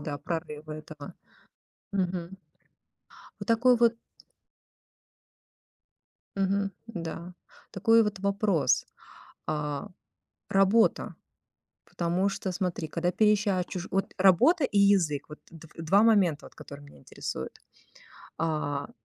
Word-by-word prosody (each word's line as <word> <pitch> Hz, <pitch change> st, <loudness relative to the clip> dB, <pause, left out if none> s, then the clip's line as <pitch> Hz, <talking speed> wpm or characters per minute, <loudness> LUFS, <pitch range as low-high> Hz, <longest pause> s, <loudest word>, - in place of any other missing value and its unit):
да, 145 Hz, -1 st, -5 dB
прорыва 155 Hz, -1 st, -5 dB
этого. 155 Hz, -1 st, -10 dB, 0.8 s
Мгм. 185 Hz, -1 st, -2 dB, 1.0 s
Вот -, -, -7 dB
такой 245 Hz, +2 st, +4 dB
вот 235 Hz, 0 st, +4 dB, 2.4 s
Мгм, 195 Hz, +1 st, 0 dB, 0.2 s
да, 175 Hz, -4 st, -7 dB, 0.4 s
такой 225 Hz, +4 st, +4 dB
вот 210 Hz, -2 st, -2 dB
вопрос, 200 Hz, -, +1 dB, 0.6 s
а, 150 Hz, -2 st, -3 dB, 0.6 s
работа 195 Hz, +4 st, +3 dB, 0.7 s
Потому 175 Hz, +3 st, -1 dB
что, 195 Hz, -1 st, -4 dB
смотри, 180 Hz, -3 st, -2 dB
когда 170 Hz, +3 st, -1 dB
переезжаешь 205 Hz, -2 st, +2 dB
чужу 180 Hz, 0 st, -6 dB
вот 195 Hz, +1 st, -1 dB
работа 195 Hz, -, +5 dB
и 205 Hz, -6 st, +1 dB
язык, 190 Hz, -8 st, +3 dB
вот 150 Hz, -, -10 dB
дв 165 Hz, -1 st, -14 dB
два 165 Hz, +5 st, +3 dB
момента, 190 Hz, -9 st, +3 dB
вот -, -, -16 dB
которые 145 Hz, 0 st, -11 dB
меня 140 Hz, -, -16 dB
интересуют. -, -, -6 dB, 0.8 s
А, 150 Hz, -3 st, -2 dB
180 Hz, 105 wpm, -28 LUFS, 155-200 Hz, 2.4 s, работа